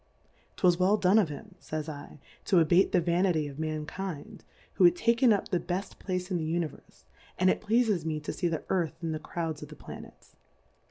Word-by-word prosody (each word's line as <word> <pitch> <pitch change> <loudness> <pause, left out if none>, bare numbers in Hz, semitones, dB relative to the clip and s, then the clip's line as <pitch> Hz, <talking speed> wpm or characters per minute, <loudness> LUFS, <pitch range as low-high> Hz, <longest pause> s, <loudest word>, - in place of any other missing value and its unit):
'Twas 180 -1 +3
well 195 +3 +4
done 195 +2 +4
of 190 -7 +2
him, 190 +7 -9
fays 155 0 -5
1, 145 -1 -9 0.2
to 190 - +2
abate 170 +3 +4
the 185 - +4
Vanity 170 -2 +1
of 140 +1 -9
Mankind, 155 +1 -5 0.3
who - - +2
had 350 0 +7
taken 235 -6 +3
up 205 - +1
the 180 - +1
befb 180 +3 -4
Place 180 0 -3
in 180 - +1
the 165 - -2
Univerfe, 165 -3 -5 0.3
and 185 0 +4
it - - -2
pleafes 215 -5 +2
me 155 -1 -2
to 150 - -4
fee 175 - -1
the 165 -2 -2
Earth 175 -5 0
in 165 - -1
the 155 - -3
Crouds 160 -1 -4
of 150 - -8
the 150 - -10
Planets. - - -12
175 Hz, 205 wpm, -29 LUFS, 155-195 Hz, 0.3 s, had